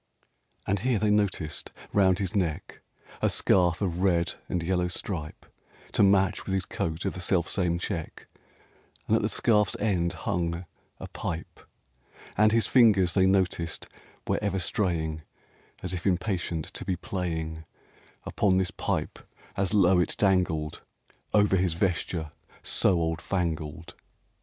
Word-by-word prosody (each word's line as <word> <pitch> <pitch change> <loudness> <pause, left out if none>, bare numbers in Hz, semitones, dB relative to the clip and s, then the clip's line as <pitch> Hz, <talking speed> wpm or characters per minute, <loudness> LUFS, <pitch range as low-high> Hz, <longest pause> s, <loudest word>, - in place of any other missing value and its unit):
(And 100 +1 0
here 125 +2 +1
they 105 +1 +2
noticed 95 -7 -1 0.2
round 95 -3 +4
his 95 -1 -3
neck 85 -6 -2 0.4
A - - +3
scarf 90 -1 +2
of 90 -2 -1
red 85 -3 +2 0.2
and 90 -2 -1
yellow 90 +1 +1
stripe, 85 -3 -5 0.5
To - - +2
match 95 -2 +3
with 95 - 0
his 95 - 0
coat 80 +3 -3
of 95 - -1
the 90 - -6
self 85 -1 +1
same 90 -3 0
check, 85 -3 -5 0.8
And - - +2
at - - +2
the - - 0
scarf's 105 -4 +3
end 90 -5 +1
hung 85 -2 -2 0.3
a - - -7
pipe; 85 0 -6 0.8
And 110 0 +4
his 115 0 +3
fingers, 100 -9 +4
they 95 +1 +4
noticed, 95 -3 0 0.4
were - - 0
ever 100 -2 -1
straying 80 -4 -1 0.6
As 90 0 -2
if 90 +1 -3
impatient 90 -4 -1
to - - -4
be 95 - -1
playing 80 -3 -4 0.6
Upon 95 -3 +2
this 95 -1 +1
pipe - - -3 0.4
as 95 -2 0
low 95 -3 +4
it 90 - 0
dangled 90 -6 +1
RAINBOW - - -31
GOLD 105 - +6
Over 95 - +2
his 90 -2 +1
vesture 85 -3 -1 0.3
so - - +3
old 80 0 -1
fangled. 85 -2 -3
90 Hz, 150 wpm, -27 LUFS, 85-95 Hz, 0.8 s, GOLD